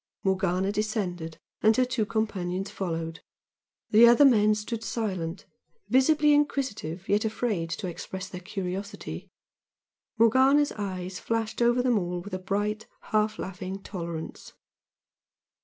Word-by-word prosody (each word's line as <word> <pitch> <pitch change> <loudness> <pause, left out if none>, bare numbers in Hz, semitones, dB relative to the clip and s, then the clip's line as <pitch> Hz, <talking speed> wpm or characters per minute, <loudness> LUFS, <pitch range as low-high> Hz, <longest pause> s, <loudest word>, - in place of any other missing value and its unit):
Morgana 190 0 +1
descended, 185 -7 -2 0.2
and 220 +2 +4
her 255 - +4
two 245 -4 -1
companions 195 -4 -2
followed. 165 -3 -4 0.7
The 225 +3 +8
other 240 +5 +7
men 215 -5 +5
stood 220 +2 -4
silent, 190 -7 -3 0.4
visibly 295 +3 +4
inquisitive 255 - -1
yet 205 +1 +2
afraid 215 -6 -1
to 165 - -4
express 185 +2 -6
their 180 -2 -8
curiosity. 195 +1 -5 0.9
Morgana's 260 +6 +5
eyes 185 -3 -5
flashed 225 0 -2
over 240 +1 +3
them 245 -4 +3
all 175 -1 -3
with 195 +3 -9
a 185 - -2
bright, 205 +3 -2 0.2
half 215 0 +2
laughing 190 +1 -6
tolerance. 170 -4 -6
205 Hz, 125 wpm, -27 LUFS, 185-230 Hz, 0.9 s, The